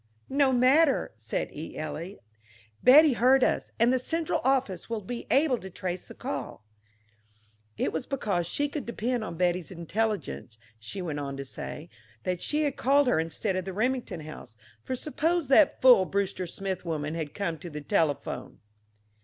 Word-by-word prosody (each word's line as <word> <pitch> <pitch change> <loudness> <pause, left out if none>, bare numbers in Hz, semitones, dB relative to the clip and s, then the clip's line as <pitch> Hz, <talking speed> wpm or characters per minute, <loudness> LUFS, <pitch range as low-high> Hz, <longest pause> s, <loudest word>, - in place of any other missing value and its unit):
"No 275 -1 +3
matter," 265 +4 +4
said 110 0 -4
E. 155 +2 -7
Eliot. 165 +5 -6 0.6
"Betty 290 +3 +8
heard 255 +3 +4
us, - - +1
and 235 +2 +4
the 260 - +2
central 325 +5 -1
office 255 -9 0
will 225 -3 -3
be 235 +5 -6
able 275 -3 +3
to 190 - -9
trace 180 0 -5
the - - -11
call." - - -5 1.1
It - - -1
was 160 - -3
because 200 -11 -1
she 290 +11 0
could 290 -2 -6
depend 235 0 -2
on 170 -6 -6
Betty's 180 -1 0
intelligence, 170 - -3 0.2
she 180 - -6
went 155 -4 -3
on 140 -1 -4
to 140 - -5
say, 150 +4 -7 0.4
that 180 -1 -2
she 300 +1 +1
had 285 -3 -1
called 280 +3 +4
her 245 -10 +2
instead 165 +5 -1
of 185 - -1
the 190 +1 -6
Remington 245 -4 -1
house 155 -7 -10 0.3
for 260 - -3
suppose 310 +3 -1
that 280 +2 +5
fool 245 -7 +8
Brewster 190 -2 -2
Smith 190 +1 -4
woman 155 -3 -3
had 160 -3 -5
come 170 -6 -2
to 175 - -8
the 150 -1 -6
telephone! 155 -4 -1
200 Hz, 170 wpm, -28 LUFS, 165-260 Hz, 1.1 s, Betty